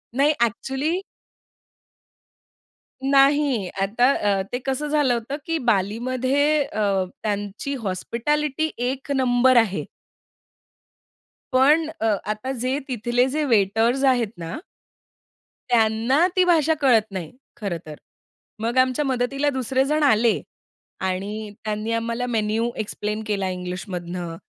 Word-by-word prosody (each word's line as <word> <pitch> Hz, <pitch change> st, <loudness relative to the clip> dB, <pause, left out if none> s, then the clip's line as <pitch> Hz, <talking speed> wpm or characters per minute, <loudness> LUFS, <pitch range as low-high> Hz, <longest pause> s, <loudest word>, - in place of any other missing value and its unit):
नाही. 280 Hz, +3 st, +4 dB
अ‍ॅक्चुअली. 265 Hz, -, -1 dB, 2.0 s
नाही. 275 Hz, -5 st, +3 dB
आता 215 Hz, +5 st, +2 dB
अ, 200 Hz, -5 st, +1 dB
ते 245 Hz, -, -1 dB
कसं 270 Hz, +2 st, -1 dB
झालं 290 Hz, -4 st, +2 dB
होतं, 240 Hz, +4 st, -3 dB
की 330 Hz, 0 st, 0 dB
बालीमध्ये 255 Hz, +7 st, +1 dB
अ, 205 Hz, -7 st, 0 dB, 0.2 s
त्यांची 205 Hz, +5 st, -3 dB
हॉस्पिटॅलिटी 270 Hz, +10 st, -1 dB
एक 260 Hz, +3 st, -3 dB
नंबर 255 Hz, -1 st, +4 dB
आहे. 215 Hz, -4 st, +2 dB, 1.7 s
पण 295 Hz, +5 st, +4 dB
अ, -, -, +1 dB, 0.3 s
आता 215 Hz, +5 st, -4 dB
जे 260 Hz, +2 st, 0 dB
तिथले 245 Hz, 0 st, +1 dB
जे 310 Hz, -, +1 dB
वेटर्स 225 Hz, +6 st, +2 dB
आहेत 240 Hz, -3 st, 0 dB
ना. 165 Hz, 0 st, -5 dB, 1.1 s
त्यांना 230 Hz, +6 st, +3 dB
ती 370 Hz, -, +5 dB
भाषा 325 Hz, -3 st, +4 dB
कळत 225 Hz, -6 st, +3 dB
नाही 180 Hz, -5 st, -5 dB, 0.3 s
खरं 200 Hz, -6 st, -3 dB
तर. 155 Hz, -1 st, -8 dB, 0.6 s
मग 230 Hz, +3 st, -2 dB
आमच्या 255 Hz, +3 st, +3 dB
मदतीला 270 Hz, +2 st, 0 dB
दुसरे 265 Hz, -1 st, 0 dB
जण 305 Hz, +2 st, +1 dB
आले 230 Hz, -4 st, +3 dB, 0.6 s
आणि 200 Hz, +3 st, -3 dB
त्यांनी 215 Hz, +1 st, -3 dB
आम्हाला 230 Hz, +2 st, -1 dB
मेनू 225 Hz, 0 st, 0 dB
एक्सप्लेन 210 Hz, 0 st, -3 dB
केला 200 Hz, -3 st, -1 dB
इंग्लिशमधनं 180 Hz, -1 st, -5 dB
240 Hz, 115 wpm, -23 LUFS, 210-270 Hz, 2.0 s, ती